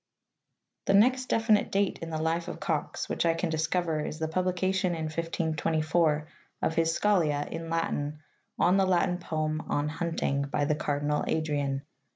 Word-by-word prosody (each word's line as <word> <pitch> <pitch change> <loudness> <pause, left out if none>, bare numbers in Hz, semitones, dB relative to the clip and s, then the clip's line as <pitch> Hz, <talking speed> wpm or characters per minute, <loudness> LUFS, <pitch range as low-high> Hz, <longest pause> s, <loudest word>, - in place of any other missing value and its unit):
The 195 - +4
next 255 +5 +4
definite 225 -2 +2
date 200 0 +1
in 165 - -5
the 160 - -2
life 165 +2 0
of - - -6
Cox 155 -4 -2
which - - -1
I 165 -1 +3
can 165 0 -1
discover 160 0 0
is 155 - -4
the 160 0 -1
publication 185 +2 0
in 160 - -3
1524 160 -1 0 0.4
of - - +2
his 165 0 +1
scholia, 160 -8 +2
in 165 0 -6
Latin, 155 -3 -1 0.4
on 180 +2 +4
the 195 -1 +3
Latin 180 0 +2
poem 155 -2 -2
on 145 +1 0
Hunting 165 -3 -1
by 145 +1 0
the 150 - +2
Cardinal 150 0 -1
Adrian.' 145 -3 -1
165 Hz, 165 wpm, -29 LUFS, 155-180 Hz, 0.4 s, The